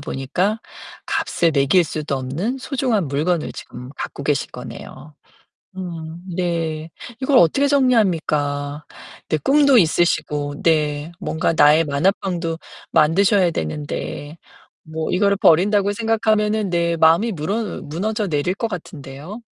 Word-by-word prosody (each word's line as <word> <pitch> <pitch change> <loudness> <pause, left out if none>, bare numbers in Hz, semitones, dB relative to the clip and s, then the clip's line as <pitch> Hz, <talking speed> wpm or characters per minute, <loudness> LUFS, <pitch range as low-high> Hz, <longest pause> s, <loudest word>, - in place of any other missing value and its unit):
보니까 175 +11 -2 0.5
값을 170 - 0
매길 150 +5 +3
수도 150 -2 -3
없는 160 - -3
소중한 250 - -1
물건을 155 +4 -1
지금 125 +1 -10
갖고 - - -6
계신 - - 0
거네요. 145 +3 -10 0.6
음 170 -2 -7
네. 165 -3 -2 0.3
이걸 265 +1 +2
어떻게 225 - +4
정리합니까? 155 - +1 0.4
네 155 - +1
꿈도 280 - +4
있으시고 150 -4 +1
네 150 -1 +1
뭔가 160 +1 -1
나의 150 +3 +6
만화방도 165 +2 -1 0.3
만드셔야 185 +4 +4
되는데. 145 - -5 0.5
뭐 160 0 -3
이거를 200 +1 +2
버린다고 200 +3 +3
생각하면은 215 -2 +1
네 170 -1 +1
마음이 165 +8 +4
무너 200 +5 -3
무너져 200 +7 -2
내릴 155 +3 0
것 230 +3 -2
같은데요. 160 - -8
170 Hz, 275 characters per minute, -20 LUFS, 150-205 Hz, 0.6 s, 나의